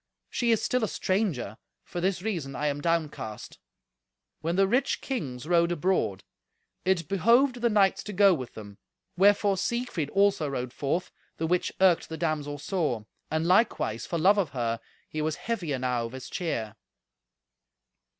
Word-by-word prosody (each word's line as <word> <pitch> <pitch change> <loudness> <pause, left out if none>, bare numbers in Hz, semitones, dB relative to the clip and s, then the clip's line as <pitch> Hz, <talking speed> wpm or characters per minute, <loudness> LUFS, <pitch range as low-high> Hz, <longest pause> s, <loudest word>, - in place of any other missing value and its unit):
She 240 - 0
is 225 -2 +3
still 250 -2 +1
a - - +2
stranger. 185 - -1 0.2
For 175 - -5
this 185 -1 0
reason 165 -11 -3
I 150 - -2
am 145 -1 -1
downcast." 150 -10 -2 0.8
When 165 +2 -1
the 195 +1 +4
rich 250 +6 +1
kings 140 - -4
rode 170 0 +3
abroad, 170 - 0 0.6
it 180 -4 +1
behoved 240 - +3
the 235 - +3
knights 200 -3 +3
to 210 - -5
go 195 0 +6
with 130 -7 -5
them, 100 -2 -10 0.4
wherefore 200 +1 +4
Siegfried 200 - -2
also 195 -6 +2
rode 125 -2 -4
forth, 145 +7 -2 0.3
the 165 - -1
which 180 +2 +1
irked 185 -3 +4
the 160 - -5
damsel 150 -3 -2
sore; 145 - -2 0.2
and 160 +1 0
likewise, 180 - +2
for 170 - -2
love 195 +5 +5
of 180 -7 0
her, 115 -1 -1 0.3
he 155 - -4
was 155 0 0
heavy 200 -9 -3
enow 125 -3 0
of 115 - -13
his 130 -1 -8
cheer. 115 - -3
170 Hz, 160 wpm, -28 LUFS, 140-200 Hz, 0.8 s, go